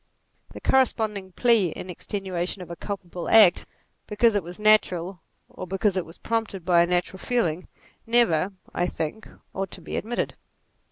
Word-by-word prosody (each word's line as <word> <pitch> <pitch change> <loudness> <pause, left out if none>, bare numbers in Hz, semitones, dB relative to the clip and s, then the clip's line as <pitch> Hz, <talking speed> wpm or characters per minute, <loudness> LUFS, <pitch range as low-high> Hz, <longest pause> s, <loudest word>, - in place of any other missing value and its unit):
The - - -8
corresponding 215 -7 +1
plea 230 -2 +4
in - - -8
extenuation 185 0 -4
of 170 - -11
a - - -5
culpable 180 -3 -6
act 210 -6 +6 0.4
because 225 +2 +3
it 205 - +1
was 175 +1 -10
natural, 195 -4 +3 0.3
or 185 - -9
because 195 +2 0
it 185 -3 -2
was 165 - -13
prompted 220 -6 -3
by 175 -2 +5
a 170 - +3
natural 180 +1 -1
feeling, 180 -9 -1 0.4
never, 205 -7 +3 0.2
I 175 - 0
think, 170 +6 -5 0.3
ought 195 0 -3
to - - -10
be - - -5
admitted. 240 +3 -2
190 Hz, 160 wpm, -25 LUFS, 175-215 Hz, 0.4 s, act